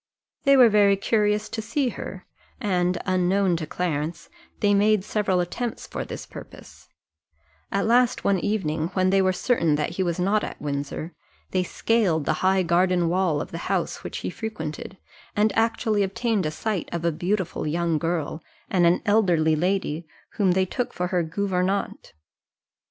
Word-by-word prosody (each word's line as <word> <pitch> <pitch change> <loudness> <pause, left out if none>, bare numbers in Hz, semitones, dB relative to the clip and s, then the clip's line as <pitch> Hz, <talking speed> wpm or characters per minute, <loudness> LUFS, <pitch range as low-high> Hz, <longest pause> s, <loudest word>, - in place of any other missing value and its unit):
They 275 0 +6
were 250 -2 +8
very 205 -2 +5
curious 210 +1 +1
to 220 - -4
see 245 +5 0
her: 190 -4 -7 0.3
and, 180 -3 +1
unknown 185 0 +2
to 160 -2 -5
Clarence, 155 -1 -3 0.3
they 205 -1 +3
made 205 0 +3
several 205 -3 0
attempts 225 +7 -3
for - - -5
this - - -7
purpose: - - -13 0.8
at 200 - 0
last 245 +2 +3
one 195 -2 +2
evening, 165 -6 -1
when 185 0 +2
they 195 0 +4
were 185 0 +3
certain 180 - +1
that 150 +2 -1
he 180 - -3
was 175 -1 -1
not 200 +4 +2
at - - -6
Windsor, 145 +3 -4 0.4
they 185 - +1
scaled 180 -4 +1
the 155 - +2
high 190 0 +3
garden 175 0 +2
wall 175 -4 +1
of - - -7
the 165 - -5
house - - -1
which - - -5
he - - -2
frequented, 190 -4 -6 0.4
and 210 +1 +2
actually 225 -2 +1
obtained 200 -1 0
a - - 0
sight 195 +3 -3
of 170 0 -3
a 170 - +3
beautiful 180 +1 -2
young 165 0 0
girl 165 -1 -2 0.3
and 175 -2 +4
an 170 - +2
elderly 175 -7 +3
lady, 170 -2 -1 0.2
whom 190 -4 +2
they 190 +1 +2
took 245 +6 -3
for 180 0 -2
her 180 -2 +1
gouvernante. 190 +3 -2
185 Hz, 170 wpm, -24 LUFS, 170-210 Hz, 0.8 s, were